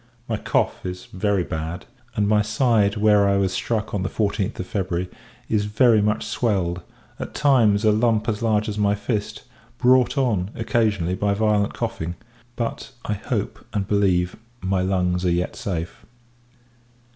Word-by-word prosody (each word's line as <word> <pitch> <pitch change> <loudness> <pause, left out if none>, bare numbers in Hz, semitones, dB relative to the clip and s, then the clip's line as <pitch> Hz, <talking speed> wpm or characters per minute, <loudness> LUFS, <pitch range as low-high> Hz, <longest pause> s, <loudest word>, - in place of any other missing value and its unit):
My 110 - -1
cough - - 0
is 90 0 -5
very 100 -1 0
bad; 80 +3 -5 0.3
and 105 -3 +1
my 105 0 +4
side, 110 -2 +2
where 105 -1 +4
I 100 - +3
was 95 -1 +1
struck 110 +1 -2
on 100 - 0
the 95 - -1
14th 100 -2 -1
of 95 - -3
February, 95 -2 -2 0.4
is 105 -2 +1
very 110 +1 +4
much 105 +1 0
swelled; 90 -7 0 0.4
at - - -6
times, 115 -8 +4
a 110 - +6
lump 110 0 +2
as 110 -1 -1
large 110 -2 +1
as 105 -1 -3
my 100 0 +3
fist, 105 +1 -3 0.3
brought 130 +2 +4
on, 105 -9 +1
occasionally, 105 -6 0
by 100 +2 0
violent 105 -1 +1
coughing: 85 +2 -3 0.4
but, 115 +3 -4
I 105 - -1
hope, 100 - -3
and 100 -2 -1
believe, 95 -4 +2 0.2
my 95 0 0
lungs 90 -1 0
are 90 - +2
yet 85 +1 -1
safe. 85 -4 -4
105 Hz, 160 wpm, -23 LUFS, 95-110 Hz, 0.4 s, a